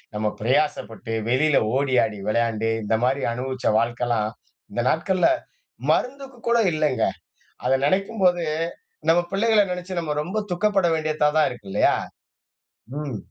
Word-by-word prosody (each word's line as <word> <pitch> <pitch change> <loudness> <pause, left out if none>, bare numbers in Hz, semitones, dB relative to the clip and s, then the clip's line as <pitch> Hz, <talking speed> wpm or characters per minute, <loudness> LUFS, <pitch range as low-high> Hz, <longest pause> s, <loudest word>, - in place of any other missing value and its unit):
நம்ம 105 0 0
பிரயாசப்பட்டு, 125 -3 -1 0.2
வெளியில 145 +4 +3 0.2
ஓடி 135 -1 +1
ஆடி 105 -2 -6
விளையாண்டு, 115 0 +1
இந்த 110 +1 +1
மாரி 130 +2 +1
அனுபவிச்ச 130 +1 -3
வாழ்க்கலாம், 120 -2 0 0.4
இந்த 120 - -1
நாட்கள்ல 185 - +2 0.6
மருந்துக்குக் 265 -2 -2
கூட 235 - +4 0.2
இல்லைங்க. 155 -4 +1 0.6
அத 125 - +2
நெனைக்கும்போது, 190 -1 +2 0.7
நம்ம 175 +1 +5
பிள்ளைகள 215 +1 +4
நெனைச்சு 180 0 -4
நாம 150 -3 -3
ரொம்ப 205 +7 -3
துக்கப்பட 195 0 +2
வேண்டியதா 155 -1 +1
தான் 155 - +4
இருக்கு 105 -6 -10
இல்லையா? - - +3 1.0
ம். 140 -7 -4
150 Hz, 125 wpm, -23 LUFS, 120-185 Hz, 1.0 s, நம்ம